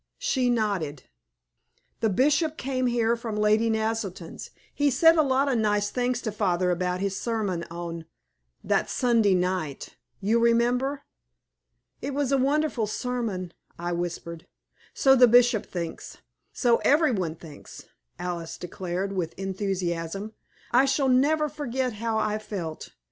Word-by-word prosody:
She 265 Hz, -, 0 dB
nodded. 200 Hz, -, -1 dB, 1.0 s
"The 225 Hz, -, +2 dB
Bishop 295 Hz, -, +2 dB
came 255 Hz, -1 st, -1 dB
here 235 Hz, -1 st, +2 dB
from 230 Hz, -2 st, -5 dB
Lady 210 Hz, +2 st, +3 dB
Naselton's. 220 Hz, -6 st, -3 dB, 0.2 s
He 290 Hz, 0 st, +2 dB
said 325 Hz, +5 st, +5 dB
a 315 Hz, -, +5 dB
lot 270 Hz, -1 st, +2 dB
of 255 Hz, -4 st, +1 dB
nice 205 Hz, -1 st, +1 dB
things 250 Hz, 0 st, -1 dB
to 220 Hz, -, -2 dB
father 185 Hz, -3 st, +1 dB
about 180 Hz, +1 st, -1 dB
his 195 Hz, -1 st, -1 dB
sermon 210 Hz, -7 st, -2 dB
on 170 Hz, -1 st, -6 dB, 0.6 s
that -, -, +1 dB
Sunday 230 Hz, -6 st, +3 dB
night 180 Hz, -6 st, -2 dB, 0.2 s
you 215 Hz, +4 st, +2 dB
remember." 240 Hz, +4 st, +2 dB, 1.0 s
"It 275 Hz, +1 st, -4 dB
was 285 Hz, -2 st, 0 dB
a 275 Hz, -, +4 dB
wonderful 275 Hz, -4 st, +1 dB
sermon," 215 Hz, -6 st, -3 dB, 0.2 s
I 175 Hz, +1 st, -3 dB
whispered. 170 Hz, -1 st, -4 dB, 0.5 s
"So 270 Hz, -1 st, +5 dB
the 250 Hz, -1 st, +7 dB
Bishop 240 Hz, -2 st, +4 dB
thinks; 170 Hz, -3 st, -6 dB, 0.3 s
so 240 Hz, -2 st, +3 dB
every 300 Hz, 0 st, +3 dB
one 180 Hz, -8 st, -2 dB
thinks," 155 Hz, -3 st, -12 dB, 0.3 s
Alice 175 Hz, -2 st, -5 dB
declared, 180 Hz, +2 st, -4 dB
with 170 Hz, -4 st, -3 dB
enthusiasm. 190 Hz, 0 st, -3 dB, 0.4 s
"I 250 Hz, +3 st, +5 dB
shall 270 Hz, 0 st, +1 dB
never 300 Hz, +4 st, +3 dB
forget 260 Hz, -4 st, -3 dB
how 225 Hz, +1 st, -2 dB
I 215 Hz, 0 st, 0 dB
felt. 190 Hz, -7 st, -6 dB
220 Hz, 140 wpm, -26 LUFS, 180-250 Hz, 1.0 s, the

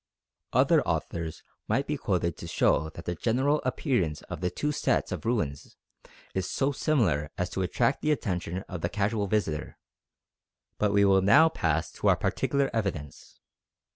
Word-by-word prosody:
Other -, -, +4 dB
authors 80 Hz, -2 st, -3 dB, 0.2 s
might -, -, +1 dB
be -, -, -2 dB
quoted -, -, -1 dB
to -, -, -8 dB
show 80 Hz, +2 st, +2 dB
that 85 Hz, +1 st, -10 dB
the 90 Hz, -, -1 dB
general 130 Hz, -, +1 dB
appearance 125 Hz, -, -1 dB
of 85 Hz, -3 st, -7 dB
the 90 Hz, -, +1 dB
two 150 Hz, +10 st, -2 dB
sets 140 Hz, -3 st, 0 dB
of -, -, -4 dB
ruins 80 Hz, -, -2 dB, 0.6 s
is 95 Hz, -1 st, -2 dB
so 135 Hz, +1 st, +1 dB
similar 105 Hz, -, +1 dB
as 90 Hz, 0 st, -2 dB
to 95 Hz, -, -2 dB
attract 115 Hz, +8 st, +1 dB
the 155 Hz, -, +1 dB
attention 90 Hz, -, -2 dB
of 90 Hz, -3 st, -6 dB
the 85 Hz, -, -1 dB
casual 105 Hz, +1 st, 0 dB
visitor; 90 Hz, -7 st, -2 dB, 1.0 s
but 105 Hz, -1 st, +2 dB
we 100 Hz, 0 st, +4 dB
will 95 Hz, -1 st, +5 dB
now 145 Hz, +12 st, +6 dB
pass 80 Hz, -, -1 dB
to -, -, -2 dB
our -, -, +6 dB
particular 140 Hz, -1 st, 0 dB
evidence. 95 Hz, -10 st, -4 dB
100 Hz, 165 wpm, -28 LUFS, 85-125 Hz, 1.0 s, now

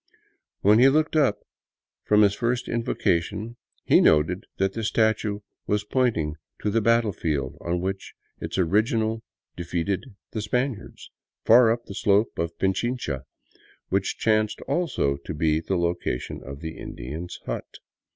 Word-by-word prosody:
When 105 Hz, +3 st, +5 dB
he 130 Hz, +2 st, +7 dB
looked 155 Hz, +3 st, +1 dB
up 130 Hz, -10 st, +2 dB, 0.6 s
from 105 Hz, 0 st, +5 dB
his 100 Hz, -1 st, +4 dB
first 120 Hz, +3 st, -1 dB
invocation 110 Hz, 0 st, -1 dB, 0.3 s
he -, -, +5 dB
noted 80 Hz, +4 st, +3 dB
that 95 Hz, 0 st, +1 dB
the 115 Hz, -, -4 dB
statue 110 Hz, -1 st, +1 dB, 0.3 s
was 105 Hz, 0 st, +1 dB
pointing 105 Hz, -, 0 dB, 0.3 s
to 105 Hz, -, +1 dB
the 115 Hz, +2 st, +2 dB
battlefield 100 Hz, -, +1 dB
on 85 Hz, +1 st, -1 dB
which 95 Hz, +1 st, -4 dB, 0.2 s
its -, -, -4 dB
original 110 Hz, +5 st, +1 dB, 0.3 s
defeated 90 Hz, +4 st, -2 dB, 0.3 s
the 110 Hz, -, -3 dB
Spaniards, 125 Hz, +2 st, -3 dB, 0.3 s
far 115 Hz, 0 st, +7 dB
up 120 Hz, +1 st, -2 dB
the -, -, -8 dB
slope 105 Hz, +1 st, +2 dB
of 85 Hz, 0 st, -2 dB
Pichincha, 95 Hz, -, -1 dB, 0.6 s
which 95 Hz, 0 st, 0 dB
chanced 110 Hz, -1 st, +1 dB
also 140 Hz, -, 0 dB
to 70 Hz, +3 st, -7 dB
be 80 Hz, 0 st, +2 dB
the 95 Hz, +3 st, -1 dB
location 85 Hz, -7 st, -2 dB
of 70 Hz, +2 st, -8 dB
the 80 Hz, -1 st, -6 dB
Indian's 80 Hz, +8 st, -6 dB
hut. -, -, -5 dB
100 Hz, 140 wpm, -25 LUFS, 85-115 Hz, 0.6 s, he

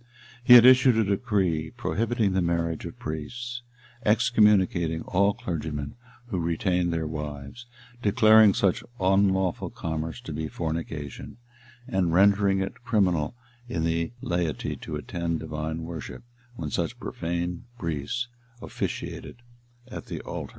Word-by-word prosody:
He 125 Hz, 0 st, +9 dB
had 120 Hz, 0 st, +10 dB
issued 130 Hz, -2 st, +7 dB
a 110 Hz, -, +4 dB
decree 95 Hz, -6 st, 0 dB
prohibiting 115 Hz, -2 st, 0 dB
the 95 Hz, -, +2 dB
marriage 85 Hz, -1 st, -1 dB
of -, -, -8 dB
priests, 120 Hz, +11 st, -5 dB, 0.4 s
excommunicating 105 Hz, -8 st, +3 dB
all 100 Hz, +2 st, +2 dB
clergymen 75 Hz, -4 st, -4 dB, 0.3 s
who 105 Hz, -7 st, -3 dB
retained 85 Hz, +1 st, 0 dB
their 80 Hz, -1 st, -1 dB
wives, 75 Hz, -, -6 dB, 0.3 s
declaring 110 Hz, -1 st, +6 dB
such 95 Hz, -3 st, +1 dB, 0.2 s
unlawful 95 Hz, -1 st, +2 dB
commerce 80 Hz, 0 st, -4 dB
to -, -, -7 dB
be 80 Hz, 0 st, -3 dB
fornication, 80 Hz, -, -5 dB, 0.5 s
and 95 Hz, -8 st, +1 dB
rendering 100 Hz, 0 st, +4 dB
it 95 Hz, +5 st, -5 dB
criminal 95 Hz, -8 st, +1 dB, 0.3 s
in 80 Hz, -8 st, -2 dB
the 85 Hz, +3 st, 0 dB
laity 85 Hz, -3 st, -1 dB
to -, -, -6 dB
attend 85 Hz, -2 st, -3 dB
divine 80 Hz, +1 st, -4 dB
worship, 80 Hz, -6 st, -7 dB, 0.3 s
when 75 Hz, -8 st, -5 dB
such -, -, -2 dB
profane 85 Hz, +2 st, -3 dB
priests 85 Hz, -, -3 dB, 0.3 s
officiated 120 Hz, 0 st, -5 dB, 0.4 s
at -, -, -8 dB
the -, -, -5 dB
altar. -, -, -6 dB
90 Hz, 125 wpm, -26 LUFS, 80-105 Hz, 0.5 s, had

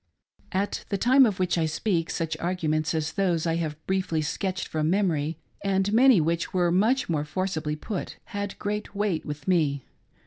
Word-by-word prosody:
At 195 Hz, +2 st, -1 dB
the 200 Hz, -, 0 dB
time 255 Hz, +5 st, +6 dB
of 200 Hz, -4 st, -2 dB
which 180 Hz, -2 st, +1 dB
I 160 Hz, -, +2 dB
speak, 165 Hz, +1 st, -1 dB
such 165 Hz, -1 st, -2 dB
arguments 155 Hz, -3 st, -1 dB
as 155 Hz, -1 st, -1 dB
those 175 Hz, -5 st, 0 dB
I 165 Hz, 0 st, +1 dB
hatve 155 Hz, -3 st, -2 dB
briefly 185 Hz, -5 st, 0 dB
sketched 190 Hz, +4 st, -2 dB
from 155 Hz, 0 st, -1 dB
memory, 165 Hz, -5 st, +1 dB, 0.3 s
and 195 Hz, +1 st, +1 dB
many 250 Hz, -2 st, +6 dB
which 165 Hz, +3 st, -1 dB
were 175 Hz, -1 st, +3 dB
much 225 Hz, +9 st, +2 dB
more 155 Hz, -4 st, 0 dB
forcibly 155 Hz, -1 st, -2 dB
put, 185 Hz, +5 st, -5 dB, 0.2 s
had 205 Hz, 0 st, -3 dB
great 210 Hz, 0 st, -4 dB
weight 200 Hz, -5 st, -1 dB
with 150 Hz, +2 st, -6 dB
me. 150 Hz, -7 st, +2 dB
175 Hz, 175 wpm, -26 LUFS, 155-200 Hz, 0.3 s, time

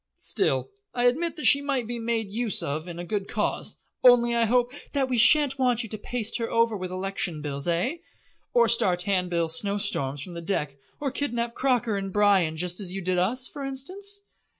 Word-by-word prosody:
Still, -, -, -1 dB, 0.2 s
I 245 Hz, -, +1 dB
admit 315 Hz, +8 st, +2 dB
that 305 Hz, -, -5 dB
she 280 Hz, -, +7 dB
might 275 Hz, -4 st, -1 dB
be 240 Hz, +1 st, -4 dB
made 225 Hz, -1 st, -1 dB
use 220 Hz, +1 st, -2 dB
of 155 Hz, +4 st, -3 dB
in 170 Hz, -1 st, -7 dB
a 175 Hz, -, -5 dB
good 200 Hz, +1 st, -2 dB
cause, 210 Hz, -, -2 dB, 0.3 s
only 240 Hz, -1 st, +6 dB
I 235 Hz, -1 st, +3 dB
hope 245 Hz, +2 st, +2 dB
" -, -, -26 dB
"That 270 Hz, -2 st, +1 dB
we 250 Hz, -2 st, +1 dB
shan't 280 Hz, +2 st, +6 dB
want 245 Hz, -2 st, +2 dB
you 225 Hz, -, -7 dB
to 215 Hz, -, -4 dB
paste 230 Hz, 0 st, -3 dB
her 230 Hz, -, -2 dB
over 230 Hz, -1 st, +2 dB
with 185 Hz, -2 st, -4 dB
election 185 Hz, -3 st, -3 dB
bills, 140 Hz, 0 st, -4 dB
eh? 175 Hz, -, 0 dB, 0.5 s
or 235 Hz, -1 st, +4 dB
start 185 Hz, -6 st, +1 dB
handbill 180 Hz, -4 st, 0 dB
snowstorms 160 Hz, -6 st, -1 dB
from 180 Hz, -, -9 dB
the 170 Hz, -, -6 dB
deck 150 Hz, -6 st, -2 dB, 0.2 s
or 280 Hz, -2 st, -2 dB
kidnap 240 Hz, -5 st, -2 dB
Croker 245 Hz, -5 st, +1 dB
and 195 Hz, -1 st, -4 dB
Bryan 195 Hz, -6 st, +3 dB
just 180 Hz, +3 st, -1 dB
as 190 Hz, -3 st, -3 dB
you 195 Hz, -, -4 dB
did 180 Hz, 0 st, 0 dB
us, 250 Hz, +8 st, +1 dB
for 285 Hz, -3 st, -8 dB
instance?" 375 Hz, +10 st, -3 dB
225 Hz, 205 wpm, -26 LUFS, 180-250 Hz, 0.5 s, she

